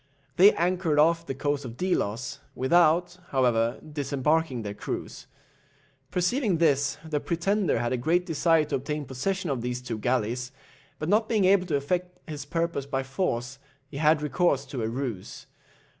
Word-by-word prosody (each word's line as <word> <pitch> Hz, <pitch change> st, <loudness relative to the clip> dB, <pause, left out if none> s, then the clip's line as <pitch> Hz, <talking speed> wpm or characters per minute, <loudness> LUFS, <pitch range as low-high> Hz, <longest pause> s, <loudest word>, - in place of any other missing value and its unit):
They 195 Hz, +4 st, +7 dB
anchored 175 Hz, -2 st, +1 dB
off 165 Hz, +2 st, +3 dB
the 135 Hz, -, -3 dB
coast 145 Hz, +1 st, -1 dB
of 120 Hz, -2 st, -8 dB
Delos, 125 Hz, -, -1 dB, 0.2 s
without, 175 Hz, +5 st, +3 dB
however, 120 Hz, -3 st, +1 dB
disembarking 145 Hz, -2 st, 0 dB
their 100 Hz, -1 st, -4 dB
crews. -, -, -6 dB, 0.8 s
Perceiving 185 Hz, -, +1 dB
this, 145 Hz, -4 st, +2 dB
the 155 Hz, -2 st, -1 dB
pretender 185 Hz, +5 st, 0 dB
had 120 Hz, +1 st, -1 dB
a -, -, 0 dB
great 170 Hz, +8 st, +1 dB
desire 165 Hz, -1 st, +2 dB
to -, -, -1 dB
obtain 150 Hz, +3 st, -4 dB
possession 175 Hz, +7 st, -2 dB
of 130 Hz, -3 st, -2 dB
these 125 Hz, +1 st, -3 dB
two 120 Hz, -3 st, -5 dB
galleys, 125 Hz, +1 st, -1 dB, 0.5 s
but 155 Hz, -, -4 dB
not 215 Hz, +4 st, +2 dB
being 215 Hz, -4 st, +2 dB
able 185 Hz, -1 st, +4 dB
to 155 Hz, -, 0 dB
effect 180 Hz, +5 st, -2 dB
his 150 Hz, -3 st, -6 dB
purpose 165 Hz, -2 st, -2 dB
by 135 Hz, -1 st, -1 dB
force, 135 Hz, -3 st, -2 dB, 0.3 s
he 140 Hz, -, -8 dB
had 150 Hz, 0 st, +3 dB
recourse 150 Hz, -3 st, +1 dB
to 135 Hz, -2 st, -5 dB
a 110 Hz, -, -1 dB
ruse. 120 Hz, -6 st, -5 dB
150 Hz, 160 wpm, -27 LUFS, 130-175 Hz, 0.8 s, They